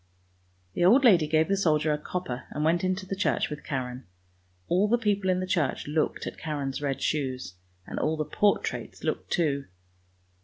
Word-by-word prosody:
The -, -, 0 dB
old 235 Hz, +10 st, +6 dB
lady 175 Hz, -10 st, +6 dB
gave 155 Hz, +1 st, +3 dB
the 195 Hz, -, +2 dB
soldier 155 Hz, -5 st, +2 dB
a -, -, 0 dB
copper 150 Hz, -7 st, -4 dB
and 150 Hz, -, -3 dB
went 170 Hz, +2 st, +2 dB
into 185 Hz, +1 st, -1 dB
the 195 Hz, -, -3 dB
church 190 Hz, -, 0 dB
with 150 Hz, 0 st, -6 dB
Karen. 125 Hz, -4 st, -4 dB, 0.6 s
All 185 Hz, +4 st, +3 dB
the 235 Hz, +3 st, +3 dB
people 205 Hz, -4 st, 0 dB
in 185 Hz, 0 st, +2 dB
the -, -, -1 dB
church 170 Hz, -7 st, 0 dB
looked 155 Hz, +1 st, -1 dB
at -, -, -6 dB
Karen's 145 Hz, -3 st, -3 dB
red 140 Hz, -2 st, -2 dB
shoes, 130 Hz, -9 st, -2 dB, 0.3 s
and -, -, -5 dB
all 155 Hz, +1 st, 0 dB
the 155 Hz, -, -1 dB
portraits 205 Hz, +5 st, 0 dB
looked -, -, -2 dB
too. 145 Hz, -5 st, 0 dB
160 Hz, 185 wpm, -27 LUFS, 145-185 Hz, 0.6 s, old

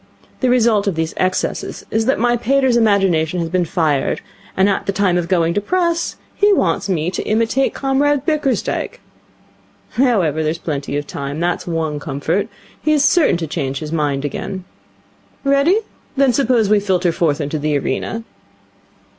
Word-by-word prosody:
The 255 Hz, -, +1 dB
result 230 Hz, -4 st, +3 dB
of 195 Hz, -, 0 dB
these 160 Hz, 0 st, -2 dB
excesses 185 Hz, 0 st, -2 dB
is 220 Hz, +1 st, 0 dB
that 265 Hz, -, +3 dB
my 240 Hz, +1 st, +2 dB
pater's 260 Hz, +1 st, +2 dB
imagination 195 Hz, -7 st, +2 dB
has 165 Hz, -1 st, -2 dB
been 180 Hz, 0 st, +1 dB
fired, 155 Hz, -4 st, 0 dB, 0.4 s
and 190 Hz, +1 st, +4 dB
at 195 Hz, -, -1 dB
time 195 Hz, -3 st, +2 dB
of 175 Hz, -1 st, 0 dB
going 170 Hz, -2 st, +2 dB
to 205 Hz, -, 0 dB
press 340 Hz, -, 0 dB, 0.2 s
he 410 Hz, +1 st, +3 dB
wants 190 Hz, -, 0 dB
me 175 Hz, -2 st, 0 dB
to 185 Hz, -, -3 dB
imitate 230 Hz, +5 st, +1 dB
Comrade 280 Hz, +1 st, +1 dB
Bickersdyke. 300 Hz, -5 st, -1 dB, 0.9 s
However, 195 Hz, -, +2 dB
there's 155 Hz, +1 st, -1 dB
plenty 145 Hz, -3 st, -3 dB
of 145 Hz, -, -3 dB
time. 140 Hz, +1 st, -5 dB
That's 175 Hz, +1 st, -1 dB
one 160 Hz, -3 st, -2 dB
comfort. 150 Hz, +7 st, -2 dB, 0.3 s
He's 305 Hz, -2 st, +2 dB
certain 315 Hz, -, +4 dB
to 170 Hz, -, -3 dB
change 140 Hz, -3 st, -3 dB
his 150 Hz, +1 st, -6 dB
mind 145 Hz, -3 st, -1 dB
again. 185 Hz, +6 st, -4 dB, 0.8 s
Ready? 280 Hz, +9 st, +3 dB, 0.4 s
Then 270 Hz, -2 st, +4 dB
suppose 235 Hz, -4 st, +2 dB
we 210 Hz, 0 st, +4 dB
filter 185 Hz, -3 st, +1 dB
forth 160 Hz, -3 st, 0 dB
into 150 Hz, +1 st, -2 dB
the 150 Hz, 0 st, 0 dB
arena?' 225 Hz, +11 st, -3 dB
190 Hz, 160 wpm, -18 LUFS, 160-250 Hz, 0.9 s, and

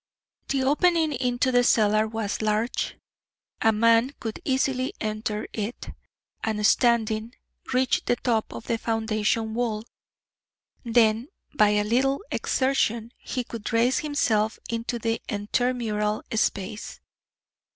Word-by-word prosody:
The 270 Hz, -1 st, 0 dB
opening 315 Hz, +3 st, +3 dB
into 250 Hz, 0 st, 0 dB
the 245 Hz, 0 st, +4 dB
cellar 215 Hz, -2 st, +3 dB
was 220 Hz, -2 st, -3 dB
large. 215 Hz, +3 st, -1 dB, 0.6 s
A 225 Hz, -, +5 dB
man 230 Hz, +5 st, +3 dB
could 225 Hz, -3 st, -5 dB
easily 260 Hz, -1 st, 0 dB
enter 215 Hz, 0 st, -3 dB
it, 215 Hz, +2 st, -5 dB, 0.5 s
and, 215 Hz, -1 st, 0 dB
standing, 230 Hz, -1 st, +2 dB, 0.4 s
reach 255 Hz, 0 st, +2 dB
the 245 Hz, -, +2 dB
top 230 Hz, -3 st, -1 dB
of -, -, -8 dB
the 230 Hz, -, -1 dB
foundation 220 Hz, 0 st, 0 dB
wall; 225 Hz, -2 st, -1 dB, 1.0 s
then, 230 Hz, 0 st, +3 dB, 0.3 s
by 210 Hz, -7 st, +4 dB
a 210 Hz, 0 st, +2 dB
little 265 Hz, -, +1 dB
exertion, 235 Hz, -4 st, 0 dB
he 255 Hz, -, -3 dB
could 230 Hz, -2 st, -6 dB
raise 235 Hz, +3 st, +3 dB
himself 220 Hz, -8 st, +1 dB
into 230 Hz, +1 st, -2 dB
the 230 Hz, 0 st, -1 dB
intermural 215 Hz, 0 st, -1 dB
space. 210 Hz, 0 st, -2 dB
230 Hz, 120 wpm, -25 LUFS, 215-250 Hz, 1.0 s, A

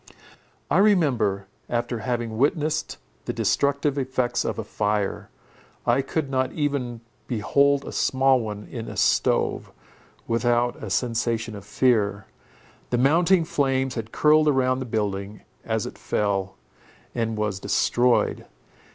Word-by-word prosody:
I -, -, +4 dB
remember, 130 Hz, -, +2 dB, 0.2 s
after 120 Hz, 0 st, -1 dB
having 120 Hz, -1 st, -2 dB
witnessed 150 Hz, +2 st, 0 dB, 0.3 s
the -, -, -2 dB
destructive 140 Hz, 0 st, +1 dB
effects 130 Hz, -2 st, -1 dB
of -, -, -3 dB
a -, -, -3 dB
fire, 105 Hz, -1 st, -2 dB, 0.6 s
I 120 Hz, +3 st, +3 dB
could 140 Hz, +2 st, -2 dB
not 130 Hz, -1 st, 0 dB
even 140 Hz, -6 st, -2 dB, 0.3 s
behold 140 Hz, +5 st, +2 dB
a -, -, -6 dB
small 135 Hz, 0 st, +3 dB
one 105 Hz, -2 st, -5 dB
in 115 Hz, -3 st, -7 dB
a -, -, -7 dB
stove, -, -, +1 dB, 0.6 s
without 120 Hz, +1 st, +1 dB
a 110 Hz, -, -5 dB
sensation 115 Hz, 0 st, -1 dB
of 100 Hz, -1 st, -10 dB
fear. 105 Hz, -5 st, +1 dB, 0.6 s
The 120 Hz, -, +1 dB
mounting 165 Hz, +7 st, +4 dB
flames 135 Hz, -3 st, 0 dB
had 115 Hz, -1 st, -5 dB
curled 155 Hz, 0 st, +4 dB
round 130 Hz, -2 st, +2 dB
the 130 Hz, -, -5 dB
building, 105 Hz, -2 st, -3 dB, 0.2 s
as -, -, -1 dB
it -, -, -8 dB
fell, 100 Hz, -2 st, -1 dB, 0.6 s
and 115 Hz, -2 st, -2 dB
was 105 Hz, -2 st, -1 dB
destroyed. 120 Hz, +4 st, +1 dB
120 Hz, 130 wpm, -24 LUFS, 110-135 Hz, 0.6 s, I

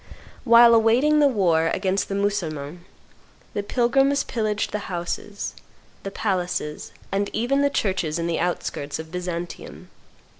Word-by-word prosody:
Whilst 235 Hz, -1 st, +8 dB
awaiting 240 Hz, +7 st, +4 dB
the 290 Hz, -, +6 dB
war 175 Hz, -10 st, +2 dB
against 190 Hz, +3 st, -1 dB
the 195 Hz, -, -2 dB
Mussulmans, 175 Hz, -6 st, -2 dB, 0.7 s
the 205 Hz, -, -1 dB
pilgrims 270 Hz, +6 st, +2 dB
pillaged 215 Hz, -3 st, -2 dB
the 210 Hz, -, -2 dB
houses, 185 Hz, +3 st, -4 dB, 0.5 s
the 195 Hz, -, -5 dB
palaces, 180 Hz, -7 st, -3 dB, 0.2 s
and 200 Hz, +1 st, 0 dB
even 250 Hz, +5 st, +1 dB
the 285 Hz, -, +3 dB
churches 185 Hz, -, -1 dB
in 170 Hz, -, -2 dB
the 170 Hz, -1 st, -1 dB
outskirts 150 Hz, -4 st, -3 dB
of 160 Hz, 0 st, -9 dB
Byzantium. 175 Hz, -1 st, -6 dB
200 Hz, 135 wpm, -23 LUFS, 175-230 Hz, 0.7 s, Whilst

